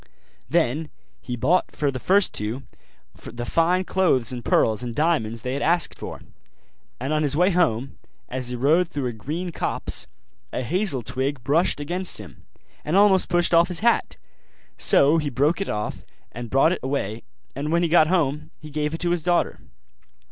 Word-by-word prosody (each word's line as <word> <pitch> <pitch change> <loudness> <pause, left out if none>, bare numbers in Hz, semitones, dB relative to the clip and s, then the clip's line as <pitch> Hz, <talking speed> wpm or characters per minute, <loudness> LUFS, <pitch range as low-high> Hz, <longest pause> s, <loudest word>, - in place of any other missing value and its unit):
Then 150 +5 +1 0.3
he 125 - -5
bought 170 +10 +2
for 145 -2 -1
the 130 - -5
first 195 +6 +3
two 110 +6 -2 0.6
the 120 0 -6
fine 170 +7 +2
clothes 165 -11 +1
and 120 -2 -6
pearls 110 0 +2
and 120 -2 -5
diamonds 115 -9 0
they 125 - -2
had 140 - -3
asked 170 +1 +1
for: - - -8 0.8
and 135 +5 -2
on 155 - +1
his 145 -1 0
way 180 +3 +4
home, 135 -8 0 0.3
as 130 -1 -4
he 125 - -3
rode 160 +8 +2
through 140 -5 -3
a 120 - -2
green 155 +11 -5
copse, - - -3 0.4
a 130 - -3
hazel 165 - 0
twig 130 +2 -3
brushed 155 +5 +2
against 180 +5 -3
him, 95 -9 -11 0.4
and 155 - -1
almost 195 -2 +4
pushed 175 0 +1
off 170 +1 +6
his 180 -1 -6
hat: 235 +1 +1 0.6
so 145 - +5
he 150 -2 -2
broke 145 +8 +1
it 195 - -3
off 105 0 -4 0.3
and 120 0 -7
brought 135 +6 +4
it 185 - -1
away; 120 -5 -3 0.3
and 145 +3 -3
when 170 +1 +2
he - - +2
got 160 -1 +5
home 150 -3 0
he 155 0 -11
gave 150 +1 -2
it - - -8
to 175 0 0
his 175 -1 0
daughter. 175 +1 0
150 Hz, 185 wpm, -23 LUFS, 125-175 Hz, 0.8 s, off